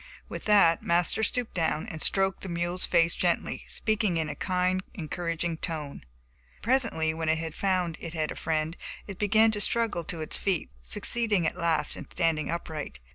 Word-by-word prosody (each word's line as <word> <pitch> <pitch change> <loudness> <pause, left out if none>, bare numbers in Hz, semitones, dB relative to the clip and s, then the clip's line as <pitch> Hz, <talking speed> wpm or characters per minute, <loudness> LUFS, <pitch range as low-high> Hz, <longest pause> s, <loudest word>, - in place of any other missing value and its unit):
With - - -7
that 200 -6 +5
Master 175 +5 +1
stooped 240 +2 0
down 160 -1 0
and 160 -8 -6
stroked 195 -1 +2
the 190 - -6
mule's 175 +1 0
face 170 -1 +3
gently, 175 -1 0
speaking 215 -5 0
in 160 -2 -1
a 150 - -4
kind, 185 +2 0
encouraging 170 0 -3
tone. 155 -4 -5 0.6
Presently 230 -10 +1
when 160 0 -2
it 160 0 0
found 180 -3 0
it 165 0 -7
had 155 -1 -1
a - - -5
friend, 160 0 -1 0.3
it 195 -3 -8
began 215 +2 +4
to 210 -1 0
struggle 225 -6 +1
to 170 - -2
its 155 - 0
feet, 190 - -1
succeeding 205 - 0
at - - 0
last 165 -2 +2
in - - -9
standing 165 -3 0
upright. 160 -2 -4
170 Hz, 175 wpm, -28 LUFS, 160-195 Hz, 0.6 s, that